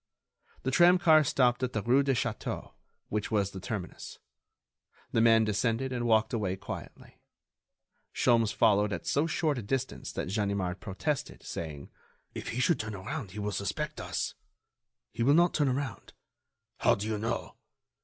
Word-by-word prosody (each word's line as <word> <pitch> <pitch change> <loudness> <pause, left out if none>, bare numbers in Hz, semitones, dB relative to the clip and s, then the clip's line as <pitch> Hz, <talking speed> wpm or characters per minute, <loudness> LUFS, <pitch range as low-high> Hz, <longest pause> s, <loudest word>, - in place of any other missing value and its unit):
The 130 - 0
tramcar 175 -1 +6
stopped 125 -2 +2
at 125 -1 -1
the 110 - -1
rue 125 +4 +4
de 135 -1 +1
Château, 115 -2 -3 0.4
which 105 -1 -2
was 100 -3 +1
the 95 - -7
terminus. 95 -2 -6 0.9
The 115 - +2
man 115 -1 +6
descended 115 +4 0
and 120 -1 -1
walked 110 0 +3
away 100 -5 0
quietly. 95 - -9 0.9
Sholmes 115 -4 +3
followed 105 0 +3
at 85 - -5
so 145 +3 +1
short 155 -4 0
a - - -4
distance 130 +5 -3
that - - -3
Ganimard 100 -2 -1
protested, 130 - -3
saying: 75 -4 -6 0.4
"If - - -6
he 120 - -3
should 145 +3 +2
turn 110 -1 -4
around 100 +4 -5
he 105 - -6
will 105 0 -2
suspect 100 0 -3
us." - - -3 0.8
"He - - -5
will 140 +5 +5
not 175 +1 +4
turn 145 -4 +2
around." 130 -4 -4 0.7
"How - - +4
do 100 - -5
you 110 -1 -2
know?" 115 +2 -3
115 Hz, 160 wpm, -30 LUFS, 100-130 Hz, 0.9 s, tramcar